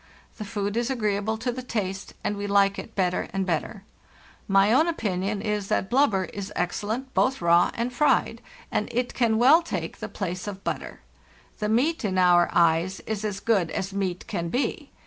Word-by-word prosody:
The 215 - -6
food 205 0 -3
is 240 +1 0
agreeable 215 -3 -1
to 245 +3 -2
the 255 +1 -5
taste, 195 -6 -4
and 205 - -1
we 205 0 -4
like 200 0 +3
it 225 - -9
better 180 -2 0
and 195 -1 -1
better. 185 +4 -2 0.6
My 195 +2 +4
own 310 +6 +4
opinion 200 - -2
is 210 -2 -1
that 195 - -1
blub 275 +4 +5
ber 190 -3 0
is 200 +1 -7
excellent 220 +9 -2
both 265 +1 +2
raw 170 0 +4
and 240 +1 -2
fried, 295 +4 +2 0.3
and - - -1
it 245 +1 -1
can 230 -3 +2
well 275 +8 +6
take 335 - -5
the - - -5
place 185 0 -4
of 195 -1 -6
butter. - - -4 0.6
The 210 -1 -1
meat, 270 +9 +1
in 190 -3 -1
our 175 -1 +5
eyes, 170 +2 +2
is 215 -1 -4
as 205 -2 -3
good 200 -8 +1
as 190 +1 -3
meat 190 -3 -2
can 170 -4 -3
be. 250 +10 -2
205 Hz, 190 wpm, -25 LUFS, 190-235 Hz, 0.6 s, well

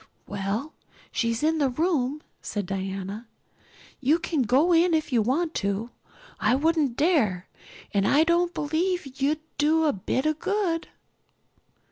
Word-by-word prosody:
"Well, 200 +10 -3 0.4
she's 230 +2 -1
in 320 +1 +2
the 280 -2 +3
room," 300 -1 0 0.2
said 205 -2 -3
Diana. 195 +3 -4 0.7
"You 290 +4 +3
can 320 -3 -1
go 270 +9 +3
in 335 0 +4
if 310 -3 -1
you 235 - +4
want 310 +9 0
to. 200 +4 -2 0.5
I 220 +4 +3
wouldn't 295 -3 +1
dare. 250 - +2 0.5
And 200 -1 +2
I 300 +3 +5
don't 340 +1 +2
believe 315 -3 -2
you'll 285 +3 +3 0.2
do 315 +2 +3
a 295 - +3
bit 220 +8 -2
of 310 0 0
good." 375 -4 -1
290 Hz, 140 wpm, -26 LUFS, 225-325 Hz, 0.7 s, I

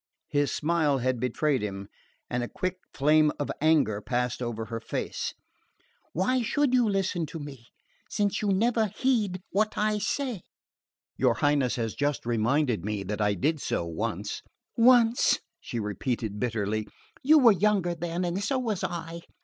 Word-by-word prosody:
His 145 -1 +1
smile 155 -3 +1
had 130 -1 0
betrayed 130 +2 0
him, 100 -1 -5 0.4
and 125 - -2
a 120 - -2
quick 185 +6 -3
flame 150 +2 +4
of 145 - -2
anger 145 -10 +3
passed 125 +2 -1
over 115 -2 -3
her 115 +1 -5
face. 115 - -4 0.8
"Why 250 +9 +1
should 280 +3 +1
you 245 -3 +4
listen 190 -4 0
to 165 - -7
me, 140 -6 -9 0.4
since 205 -1 0
you 210 - -1
never 220 +3 +2
heed 210 -4 0
what 215 +2 0
I 210 0 +1
say?" 250 -3 -2 0.8
"Your 125 -3 +3
Highness 145 -4 +2
has 115 -3 -2
just 145 -3 -1
reminded 120 +2 +1
me 105 -1 -2
that 105 +2 -3
I 105 -1 +2
did 150 - 0
so 85 - -1
once 85 -1 -3 0.2
" - - -61
"Once!" 240 0 +5 0.2
she 120 - -5
repeated 105 0 -3
bitterly. 110 -2 -1 0.3
"You 310 +4 +6
were 250 -6 +7
younger 195 -2 +2
then 170 +1 -3
and 180 +3 -2
so 270 - 0
was 220 -7 -2
I!" 170 -2 -4
155 Hz, 160 wpm, -27 LUFS, -, 0.8 s, were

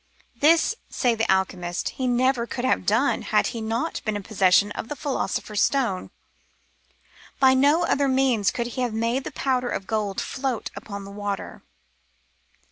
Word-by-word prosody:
This, 320 - +4 0.2
say 245 -2 +1
the 225 -2 0
alchemists, 185 -2 -1
he 260 - -3
never 245 0 +2
could 250 +1 -3
have 225 -7 +1
done 230 +7 +2
had 210 - +1
he 230 - -5
not 225 +2 -2
been 215 -1 -1
in 205 - -4
possession 195 0 +3
of 220 - -5
the 295 - -5
Philo 280 -1 -2
sopher's 210 -1 -2
Stone; 240 -10 0 1.3
by 265 -1 +6
no 290 +6 +4
other 280 -3 +1
means 260 -6 +2
could 235 - -2
he 240 +2 -4
have 240 -3 -1
made 235 +4 -1
the - - -5
powder 255 -2 -1
of 195 - -3
gold 210 -2 -2
float 260 -4 -3
upon 200 0 -7
the 200 - -9
water. 205 -1 -5
235 Hz, 170 wpm, -24 LUFS, 205-260 Hz, 1.3 s, by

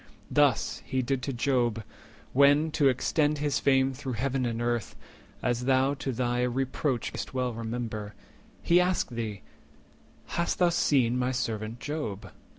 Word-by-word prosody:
Thus - - +2
he 130 0 -1
did 130 +1 -1
to 135 - -3
Job, 120 -3 0 0.5
When, 145 +3 +5
to 145 -2 +4
extend 150 +4 +1
his 145 -1 0
fame 135 -1 +3
through 130 0 -5
Heaven 130 +2 -1
and 115 -1 -3
Earth, 120 -3 -1 0.5
As 120 0 0
thou 135 +1 +3
to 135 -1 -3
thy 120 0 0
reproach 130 +1 -1
may'st - - -6
well 125 -1 0
remember, 110 -2 -5 0.5
He 175 +1 +5
asked 180 -6 0
thee, 110 -5 -4 0.8
'Hast 170 - -1
thou 175 -1 +4
seen 130 -7 +2
my 125 +1 +1
servant 115 -2 -3
Job? 145 -10 -5
125 Hz, 150 wpm, -28 LUFS, 120-140 Hz, 0.8 s, When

